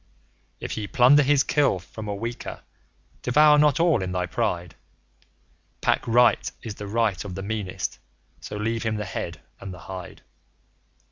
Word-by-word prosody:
If - - -5
ye 105 -2 -3
plunder 130 +7 +6
his 140 0 +4
Kill 145 -9 +2
from 105 +4 -9
a 100 - -2
weaker, 115 +3 -5 0.6
devour 150 +4 +5
not 150 -1 +4
all 165 - +3
in 95 0 -3
thy 90 0 0
pride; 85 0 -2 1.1
Pack - - +1
Right 120 +1 +4
is 110 - -5
the 105 0 -8
right 110 -3 0
of 95 -3 -7
the 95 - -5
meanest; 100 -3 -3 0.4
so 105 - -7
leave 115 +2 -1
him 110 -1 -1
the 105 0 -3
head 85 -5 -5 0.2
and 100 - -7
the 90 - -9
hide. 95 -2 -8
110 Hz, 160 wpm, -25 LUFS, 95-125 Hz, 1.1 s, plunder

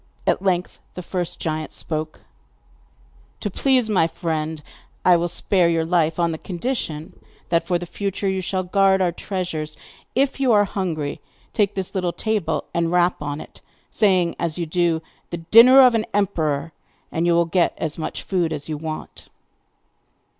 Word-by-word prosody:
At - - +2
length 185 -2 -1 0.2
the 180 - -6
first 175 -1 -3
giant 155 -1 -3
spoke: 155 -1 -4 1.2
'To 205 - -3
please 255 +1 +2
my 190 -6 +3
friend 160 -2 -3 0.4
I 180 - +7
will 170 0 +1
spare 175 0 +2
your 165 -1 +1
life 165 -2 +1
on 170 -1 +1
condition 175 - -4 0.4
that, 170 0 +1
for 180 - +2
the 175 - -6
future, 200 +2 -3
you 190 0 0
shall 185 +1 -2
guard 195 +1 +3
our 180 -2 +2
treasures. 170 -5 -4 0.4
If 275 +1 +1
you 265 -3 +3
are 205 -1 +5
hungry 165 -8 -3 0.3
take 205 -3 +1
this 190 -2 -3
little 180 -3 -1
table 215 0 -1
and 170 -1 0
rap 175 -1 +2
on 145 0 -3
it, - - -12 0.3
saying, 185 -5 +2
as 170 -1 -2
you 170 - -2
do 165 0 +1
so: - - -34 0.3
"The 170 - -4
dinner 255 +4 +9
of 250 -2 +7
an 225 -1 +1
emperor!" 160 -6 0 0.4
and 165 +2 0
you 170 - +4
will 170 0 +4
get 170 +1 +1
as 155 0 -3
much 155 - -4
food 175 -4 0
as 150 -2 -5
you 155 -2 -3
want. 155 0 -7
175 Hz, 170 wpm, -22 LUFS, 160-195 Hz, 1.2 s, dinner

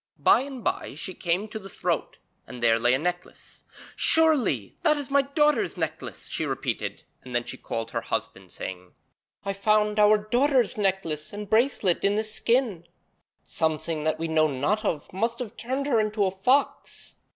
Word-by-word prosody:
By - - +5
and 265 -3 -7
by - - -2
she 185 +5 -5
came 180 +5 -1
to 220 - -6
the 195 -1 -10
throat, - - -2 0.3
and 120 -1 -9
there 115 -1 +4
lay 120 +2 +3
a - - +1
necklace. 175 +4 -6 0.3
'Surely 265 - +3
that 310 -3 +3
is 280 -2 -6
my 280 0 +5
daughter's 295 - +1
necklace,' 155 - -5
she - - -3
repeated, - - -3 0.2
and 125 -1 -8
then 120 - +1
she - - -6
called 115 0 -5
to - - -19
her - - -1
husband, - - -4
saying: 90 -1 -7 0.5
'I 195 - -1
found 210 +1 +2
our 210 0 +6
daughter's 245 +3 +2
necklace 185 -7 -1
and 205 0 -6
bracelet 220 -6 +2
in 200 +1 +2
this 215 0 -2
skin. 230 -8 0 0.6
Something 160 -1 -1
that 155 0 0
we 165 +1 -3
know 160 -1 +3
not 150 - -1
of 160 -7 -3
must 230 +5 -1
have 235 -4 -6
turned 260 +4 -3
her 250 -6 +2
into 215 -1 +1
a 190 - 0
fox.' 250 +9 0
200 Hz, 180 wpm, -26 LUFS, 155-235 Hz, 0.6 s, our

